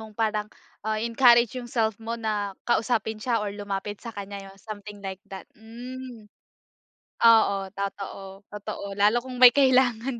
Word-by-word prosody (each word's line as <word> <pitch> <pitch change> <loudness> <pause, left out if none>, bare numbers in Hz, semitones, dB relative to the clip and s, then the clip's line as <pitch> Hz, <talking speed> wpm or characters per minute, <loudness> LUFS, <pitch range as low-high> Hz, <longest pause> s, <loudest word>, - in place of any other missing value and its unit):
mong 215 -1 -12
parang, 215 -2 -1 0.3
ah, 215 +1 -2
i-encourage 235 +1 +4
yung 240 - -9
self 220 -3 -1
mo 230 +1 -4
na 210 -3 -3
kausapin 220 -2 0
siya 240 0 0
or 200 - -4
lumapit 205 0 -5
sa 230 -2 -9
kanya 200 0 -6
yun 195 - -15
something 205 0 -10
like 190 0 -5
that, 195 -1 -8
hmm. 240 +1 -10 1.0
Oo, 200 -4 +5
totoo, 195 0 -6
totoo. 205 -1 -6
Lalo 215 +4 +3
kung 255 -1 -7
may 250 - +11
kailangan, 260 -3 +3
220 Hz, 155 wpm, -26 LUFS, 200-235 Hz, 1.0 s, may